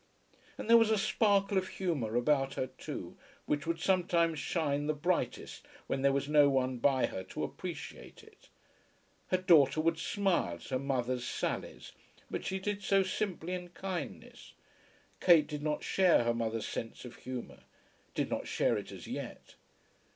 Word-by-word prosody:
And - - -6
there 235 0 +8
was 225 -1 +3
a 220 - +3
sparkle 200 -1 +2
of 185 - -5
humour 145 - -2
about 135 +2 +2
her - - -1
too, - - -7 0.3
which 145 +1 -1
would 165 0 -1
sometimes 170 -3 +2
shine 145 -4 -1
the 155 - +1
brightest 160 -4 -2 0.2
when 135 - -2
there 140 0 +4
was 140 0 0
no 145 -1 +6
one 130 -2 0
by 130 +1 +3
her 95 - -5
to - - -5
appreciate - - -7
it. - - -20 0.8
Her 185 - +2
daughter 160 -6 +5
would 165 +1 +1
smile 190 - 0
at 85 - -12
her 130 -1 0
mother's 130 -2 -1
sallies, - - -4 0.4
but - - -3
she 190 - -2
did 205 +1 -3
so 195 0 +3
simply 185 -2 -3
in 180 -1 -5
kindness. 175 - -6 0.7
Kate 165 -4 +6
did 150 -1 -5
not 150 0 -1
share 185 -9 +4
her 120 0 +1
mother's 115 -1 -2
sense 115 +2 -5
of 125 - -10
humour, 125 -1 -7 0.5
did - - 0
not - - -2
share - - +1
it - - -9
as - - -9
yet. - - -7
155 Hz, 165 wpm, -32 LUFS, 130-185 Hz, 0.8 s, there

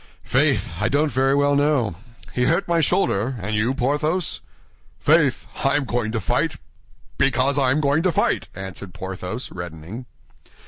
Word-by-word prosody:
"Faith! - - +2
I 105 - +1
don't 145 +3 +2
very 135 +1 +2
well 145 0 +3
know. 140 - +2 0.4
He 125 - +1
hurt 165 +7 +1
my 170 -1 +2
shoulder. 135 - +1
And 105 +3 -3
you, 115 +5 +1
Porthos?" 150 +7 0 0.6
"Faith! 150 - +3 0.2
I 135 0 +3
am 145 -2 +1
going 120 -3 -1
to 115 - -1
fight—because 135 +4 -1
I 130 -2 +3
am 140 +4 +2
going 145 +2 +2
to 185 +1 +2
fight," - - +1
answered 95 0 -8
Porthos, 95 +5 -5
reddening. 85 +7 -8
130 Hz, 150 wpm, -22 LUFS, 105-145 Hz, 0.6 s, well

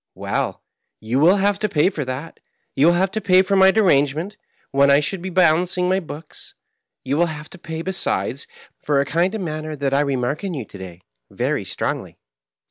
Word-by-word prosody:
Well, - - -3 0.4
you 115 +4 -1
will 170 +6 +6
have 200 0 +1
to 215 - -1
pay 175 +1 +2
for 155 -6 -3
that; 130 +6 -6 0.4
you 140 +4 +4
will 170 - +5
have 190 +2 +1
to 220 - -3
pay 185 -1 +5
for 195 +1 0
my 190 0 +7
derangement, 175 -2 +2 0.4
when 140 0 +4
I 140 +1 +6
should 170 +5 -3
be 190 - -4
balancing 180 +1 +2
my 190 +1 +2
books; 160 -3 -10 0.5
you 135 +2 -1
will 175 +1 +3
have 155 -1 -8
to 190 - -12
pay, 160 -1 -6
besides, 190 - -2 0.3
for 145 -2 +1
a 140 - +1
kind 175 +7 0
of 215 - -4
manner 155 -2 -4
that 140 -1 -2
I 140 - +3
remark 140 +2 -1
in 190 -4 -3
you 130 -6 -5
to 100 - -12
day 90 -2 -10 0.3
very - - -2
strongly. - - -4
165 Hz, 205 wpm, -21 LUFS, 140-190 Hz, 0.5 s, my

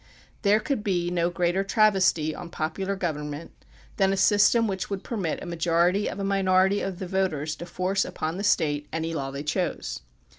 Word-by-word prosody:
There 205 +1 +4
could 240 -1 -2
be 175 -3 0
no 170 -1 +1
greater 175 +2 0
travesty 195 -7 +3
on 175 - -8
popular 190 +5 -2
govern 155 -6 -3
ment 150 +3 -7 0.5
than 195 -1 +3
a 195 - 0
system 210 +4 +4
which 190 -2 -3
would 200 -2 -4
permit 195 -9 -3
a - - -6
majority 175 +3 +1
of - - -6
a - - -2
minority 190 0 +3
of 190 -2 -3
the 190 - -5
voters 175 -5 -1
to 175 - -8
force 185 +2 0
upon 160 +3 -4
the 200 - -4
State 150 -7 +1
any 165 +1 -2
law 140 -4 -3
they 140 +1 -5
chose. 160 - -2
185 Hz, 190 wpm, -26 LUFS, 165-195 Hz, 0.5 s, There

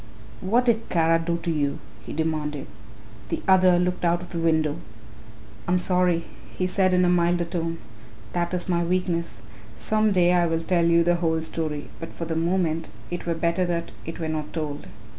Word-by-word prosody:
"What 235 +7 +2
did 230 -2 +1
Kara 165 -1 +3
do 170 +1 -1
to 170 - 0
you?" 145 -3 0 0.3
he - - -5
demanded. 150 -3 -2 0.6
The - - -3
other 185 -2 +6
looked 180 0 -1
out 170 0 +2
of - - -10
the 170 - -4
window. 160 -2 +1 0.9
"I 175 - +2
am - - +4
sorry," 180 -2 +2 0.3
he 185 - 0
said 185 0 +2
in 180 0 +4
a - - +3
milder 175 0 +2
tone; 165 -1 -3 0.6
"that 175 0 -1
is 180 - -1
my 175 -2 +1
weakness. 175 -1 -1 0.3
Some 215 0 +1
day 180 -2 +4
I 175 -1 +3
will 165 0 0
tell 170 -1 +2
you 170 0 +4
the 175 +1 +2
whole 160 -2 0
story 155 -2 -4
but 165 - -7
for 165 - -5
the 160 0 -3
moment 165 -1 0 0.2
it 175 0 -5
were 170 - 0
better 170 +2 +1
that 170 -1 -2
it 165 - -6
were 160 - -2
not 155 -1 -3
told. 150 -3 -4
170 Hz, 195 wpm, -25 LUFS, 165-180 Hz, 0.9 s, other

